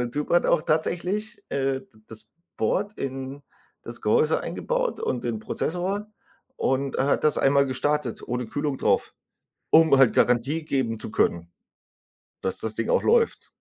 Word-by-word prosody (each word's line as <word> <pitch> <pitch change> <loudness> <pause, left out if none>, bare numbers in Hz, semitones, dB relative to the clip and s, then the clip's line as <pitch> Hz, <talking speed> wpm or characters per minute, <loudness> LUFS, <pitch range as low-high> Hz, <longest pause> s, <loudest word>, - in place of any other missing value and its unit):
Der 120 -1 -2
Typ 145 +4 -4
hat 175 - +4
auch - - +3
tatsächlich, 180 +9 -1
äh, 135 -1 0
d - - -20 0.2
das 110 -1 -9 0.3
Board 200 - 0
in 135 +1 -5 0.4
das - - -8
Gehäuse 465 -1 +2
eingebaut - - -2
und 125 - -2
den 115 -2 -2
Prozessor 185 - -3 0.5
und 135 +1 0
er 135 - +1
hat - - +1
das 150 - +3
einmal 140 0 +4
gestartet 135 -1 -1
ohne 125 0 -3
Kühlung 145 0 -2
drauf, - - +1 0.6
um 160 -3 +6
halt 135 -3 +5
Garantie 135 +7 +2
geben 130 -7 -1
zu - - -6
können, 85 -3 0 0.9
dass 95 - -2
das 110 -1 -3
Ding 115 - -2
auch - - +3
läuft. 460 0 +2
140 Hz, 160 wpm, -25 LUFS, 125-165 Hz, 0.9 s, um